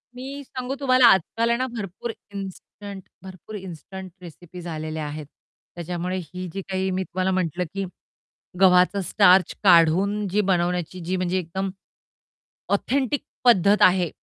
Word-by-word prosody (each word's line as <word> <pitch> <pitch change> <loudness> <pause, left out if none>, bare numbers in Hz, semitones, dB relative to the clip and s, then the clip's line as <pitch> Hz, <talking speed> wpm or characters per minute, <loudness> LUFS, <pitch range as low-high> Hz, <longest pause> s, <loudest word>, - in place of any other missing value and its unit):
मी 275 +3 -7
सांगू 255 0 -5
तुम्हाला 255 -2 +4
आजकाल 225 +4 +3
आहे 235 - +2
ना 255 +1 -1
भरपूर 225 -1 -6 0.2
इन्स्टंट 195 0 -8 0.2
भरपूर 190 +3 -10
इन्स्टंट 190 0 -8
रेसिपीज 175 +1 -11
आलेल्या 155 -1 -4
आहेत. 150 +1 -6 0.5
त्याच्यामुळे 175 +2 -3
ही 185 +2 -7
जी 195 - -4
काही 190 0 -1
मी 185 +1 -1
तुम्हाला 185 +1 -1
म्हटलं 180 -1 -1
की 195 -1 -2 0.7
गव्हाचा 185 +1 +5
स्टार्च 180 +1 +4
काढून 190 +4 +4
जी 205 +3 +1
बनवण्याची 180 0 -1
जी 185 +2 -1
म्हणजे 180 0 0
एकदम 190 +3 -3 1.0
ऑथेंटिक 270 +6 0 0.2
पद्धत 205 -3 +5
आहे 180 -2 +3
185 Hz, 135 wpm, -24 LUFS, 175-205 Hz, 1.0 s, गव्हाचा